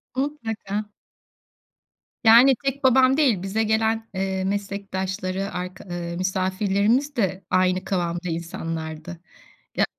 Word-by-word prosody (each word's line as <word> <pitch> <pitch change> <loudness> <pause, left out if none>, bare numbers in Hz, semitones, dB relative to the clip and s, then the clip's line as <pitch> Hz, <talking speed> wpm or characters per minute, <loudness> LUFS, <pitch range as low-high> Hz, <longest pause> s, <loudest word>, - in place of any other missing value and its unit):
Mutlaka. 225 -7 -3 1.4
Yani 240 +4 +8
tek 275 +1 -1
babam 260 +1 +5
değil 250 - +3
bize 195 +4 -1
gelen, 220 +1 +1
eee, 190 0 -1
meslektaşları, 195 -1 -3
arka 180 +1 -6
ııı 175 -1 -5
misafirlerimiz 200 +8 +1
de 195 -4 -1
aynı 185 0 +2
kıvamda 175 -2 -2
insanlardı. 165 0 -5 0.6
Ya - - +4
195 Hz, 100 wpm, -24 LUFS, 185-225 Hz, 1.4 s, Yani